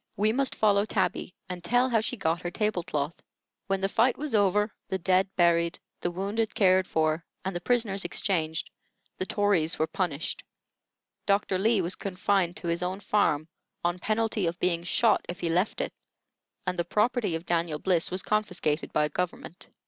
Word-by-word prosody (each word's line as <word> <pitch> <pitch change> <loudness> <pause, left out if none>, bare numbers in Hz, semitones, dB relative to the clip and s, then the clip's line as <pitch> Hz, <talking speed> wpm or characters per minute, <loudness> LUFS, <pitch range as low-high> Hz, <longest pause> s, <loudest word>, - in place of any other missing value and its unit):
We 210 +2 +3
must 265 +2 0
follow 205 -2 +3
Tabby, 195 -3 -1
and 180 -2 -6
tell 245 +7 +3
how 230 -4 +2
she 245 +3 -3
got 165 -2 0
her 175 - -3
table 210 -1 0
cloth. 150 -1 -2 0.5
When 195 0 0
the 195 - +2
fight 230 +5 +2
was 300 -3 -4
over, 210 0 +3 0.2
the 190 - -1
dead 185 +1 +2
buried, 170 -1 +3 0.2
the - - -1
wounded 200 +5 -2
cared 185 -4 +4
for, 160 +1 +1 0.2
and 190 -1 -2
the 175 - -3
prisoners 210 -2 +1
exchanged, 160 -4 -1 0.5
the 185 - -2
Tories 200 -6 +2
were 155 - +2
punished. 160 -2 -3 0.8
Dr. 200 -2 +2
Lee 220 0 +3
was 175 +2 -1
confined 185 -2 0
to - - -5
his 170 +1 0
own 185 +2 -2
farm, 165 -7 +1 0.4
on 175 +1 0
penalty 215 -2 0
of 170 +1 -2
being 170 -2 +1
shot 215 +5 +2
if 180 +1 -5
he 165 - 0
left 180 +5 +1
it, - - -2 0.7
and 180 -1 -2
the - - +3
property 210 +1 +1
of 165 +2 -5
Daniel 170 -2 0
Bliss 175 0 +1
was 185 +1 -2
confiscated 180 -8 0
by 150 0 +2
government. 175 +2 -5
185 Hz, 180 wpm, -28 LUFS, 170-210 Hz, 0.8 s, cared